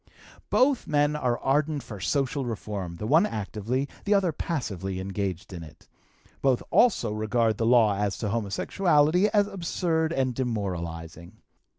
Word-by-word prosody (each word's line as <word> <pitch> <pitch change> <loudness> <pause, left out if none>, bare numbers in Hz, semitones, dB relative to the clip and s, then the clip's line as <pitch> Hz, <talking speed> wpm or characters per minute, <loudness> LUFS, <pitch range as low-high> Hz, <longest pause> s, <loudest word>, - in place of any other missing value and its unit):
"Both 265 0 +2
men 145 -1 +2
are 125 -5 0
ardent 145 +1 0
for 105 -3 -9
social 135 +6 0
reform, 105 -7 -5
the 105 - -6
one 160 - +4
actively, 110 - -3 0.2
the 205 0 +2
other 190 -4 +2
passively 95 - -3
engaged 95 0 -4
in 85 - -7
it. 80 -1 -14 0.5
Both 130 -3 +2
also 235 - +3
regard 110 +1 0
the 115 - +1
law 115 -4 +5
as 100 -1 -1
to 105 - -3
homosexuality 150 - +2
as 205 -1 +3
absurd 170 -4 -1
and 130 -5 0
demoralizing. 85 -8 -4
120 Hz, 145 wpm, -26 LUFS, 100-150 Hz, 0.5 s, law